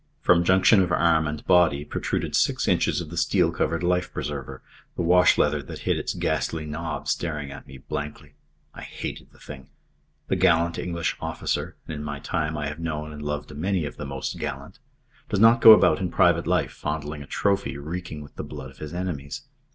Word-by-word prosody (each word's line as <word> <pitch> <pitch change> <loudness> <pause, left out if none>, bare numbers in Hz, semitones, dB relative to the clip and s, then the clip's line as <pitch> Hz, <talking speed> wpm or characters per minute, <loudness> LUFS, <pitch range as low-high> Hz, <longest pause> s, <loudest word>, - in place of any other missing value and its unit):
From 85 -1 +4
junction 95 +3 +5
of 90 -1 0
arm 80 -2 +3
and 75 +1 -5
body 85 -6 +4
protruded - - -2
six - - +1
inches - - +2
of 80 -2 -8
the 85 - -7
steel 85 -1 +2
covered 85 +1 -1
life 90 +1 +1
preserver, 65 -2 -5 0.3
the - - -2
washleather 85 -4 +4
that 65 - -9
hid - - +1
its - - -3
ghastly 80 -1 -1
knob 75 +2 -5
staring 75 -4 -2
at 70 - -10
me 65 - -11
blankly. 75 +3 -6 0.4
I - - -10
hated - - -7
the - - -22
thing. 65 -3 -11 0.6
The - - +1
gallant 85 +1 +2
English 85 -2 -2
officer - - -3
and - - -5
in 75 -1 -5
my 75 -1 -4
time 75 +1 -2
I 75 - -3
have 75 +2 -5
known 75 -2 -4
and 75 0 -9
loved 75 0 -4
a - - -9
many 90 +2 -1
of 75 - -7
the 75 - -5
most 70 -1 -5
gallant 70 - -6 0.5
does 100 - 0
not 115 +2 +6
go 110 - +11
about 110 - +6
in 95 -2 -2
private 85 -3 +3
life - - +1
fondling 75 0 -4
a 70 - -10
trophy 100 -8 0
reeking 80 +1 -6
with 70 - -16
the - - -4
blood 65 -3 -8
of 65 - -20
his 75 +2 -7
enemies. 90 - -4
80 Hz, 200 wpm, -25 LUFS, 75-90 Hz, 0.6 s, go